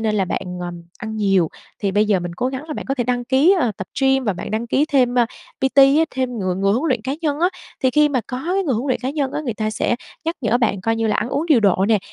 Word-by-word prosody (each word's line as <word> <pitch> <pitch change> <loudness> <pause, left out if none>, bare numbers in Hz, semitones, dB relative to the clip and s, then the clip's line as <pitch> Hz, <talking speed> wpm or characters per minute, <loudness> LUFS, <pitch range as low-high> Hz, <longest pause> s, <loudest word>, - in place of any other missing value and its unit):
nên 220 -1 0
là 195 -2 +2
bạn, - - -2 0.2
ờm, 175 -1 -6 0.2
ăn 220 0 -5
nhiều. 195 -6 +2 0.3
Thì 200 -2 -1
bây 205 +2 +3
giờ 200 -3 +2
mình 175 -1 -5
cố 245 - -1
gắng 265 +2 -5
là 305 - -4
bạn - - -5
có 270 - 0
thể 245 -3 -1
đăng 245 0 -1
ký, 275 +10 +4
ờ, 230 -4 +1
tập 190 - -6
gym 270 -1 +3
và 205 - +1
bạn 180 - -7
đăng 220 +2 -2
ký 270 +5 +2
thêm, 250 -3 +3
ơ, 240 -2 +4 0.3
PT 265 +1 0
á, 275 +4 +7
thêm 255 -2 -2
người 185 -2 -1
người 195 +2 +1
huấn 270 +9 0
luyện 245 -5 0
cá 265 +4 -2
nhân 300 -2 -1
á. 355 - +4 0.3
Thì 260 - +4
khi 300 +2 +4
mà 265 -3 0
có 255 0 -5
cái 390 - +2
người 275 -9 0
huấn 240 +6 -2
luyện 255 - 0
cá 260 +1 -2
nhân 280 -3 -2
á, - - -2
người 240 -5 -2
ta 215 0 -2
sẽ 235 +2 0 0.3
nhắc 330 +1 -1
nhở 235 -1 +2
bạn 210 -5 +1
coi 225 +3 0
như 225 - 0
là 215 - +1
ăn - - -1
uống 290 +6 -1
điều 285 -8 +5
độ 195 -2 +3
nè, 220 -2 +4
245 Hz, 305 wpm, -20 LUFS, 210-270 Hz, 0.3 s, á